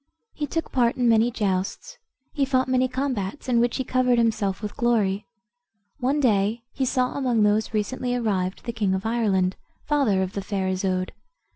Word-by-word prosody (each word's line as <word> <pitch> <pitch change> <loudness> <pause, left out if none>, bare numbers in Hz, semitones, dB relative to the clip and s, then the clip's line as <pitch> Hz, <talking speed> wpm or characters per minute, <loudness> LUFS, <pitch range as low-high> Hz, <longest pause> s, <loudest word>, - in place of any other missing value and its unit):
He 295 - -3
took 330 +3 -3
part 240 -3 +2
in 245 -1 +2
many 225 +1 +4
justs; 200 - -2 0.3
he 285 - 0
fought 260 -1 +1
many 255 0 +2
combats, 255 -4 -3
in 240 -2 +3
which 240 0 +1
he 260 - -1
covered 255 -1 +2
himself 215 -4 0
with 210 - -5
glory. 215 -4 +1 0.7
One 270 +3 +1
day 220 -2 +2
he 265 - -1
saw 255 0 0
among 245 -6 +1
those 210 +1 +2
recently 245 +4 -1
arrived 195 -6 -1
the 235 - -3
king 205 -4 0
of 190 - -4
Ireland, 200 -5 +1 0.3
father 260 -11 +2
of 185 - -4
the 200 - -3
fair 195 -1 -2
Isoude. 185 0 -1
230 Hz, 175 wpm, -24 LUFS, 195-255 Hz, 0.7 s, many